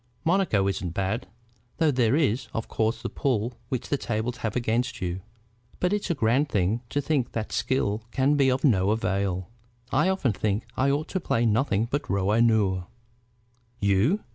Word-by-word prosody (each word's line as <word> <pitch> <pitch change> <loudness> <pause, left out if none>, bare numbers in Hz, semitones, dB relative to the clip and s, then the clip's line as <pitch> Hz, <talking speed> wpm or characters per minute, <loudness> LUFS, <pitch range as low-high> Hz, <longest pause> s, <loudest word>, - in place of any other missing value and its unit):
"Monaco 165 - +2
isn't 90 -3 -3
bad, 95 +2 -1 0.5
though 160 -3 +3
there 125 -2 +2
is, 130 -6 +1
of 110 - -2
course, 110 +1 -1
the - - -1
pull 125 -4 -1 0.2
which 130 -1 -3
the 145 - 0
tables 115 +1 -2
have 110 -2 -3
against 120 +1 0
you. 90 +1 -3 0.6
But 180 +2 +1
it's 210 -2 -1
a 170 - +1
grand 130 +3 +2
thing 100 +3 +1
to 145 - 0
think 140 -4 -1
that 110 -2 -3
skill 110 -5 0
can 135 +4 +2
be 135 -2 +4
of 130 +1 0
no 100 -9 +3
avail. 100 -3 -1 0.4
I 150 +7 +3
often 175 - +1
think 105 +2 -1
that 115 - -26
I 135 +1 +2
ought 145 +3 0
to 190 - -1
play 120 -8 0
nothing 110 -1 +2
but 140 +5 -3
rouge 100 +2 +1
et - - +6
noir." 95 -6 +2 0.9
"You?" 105 - +2
115 Hz, 185 wpm, -26 LUFS, 100-140 Hz, 0.9 s, et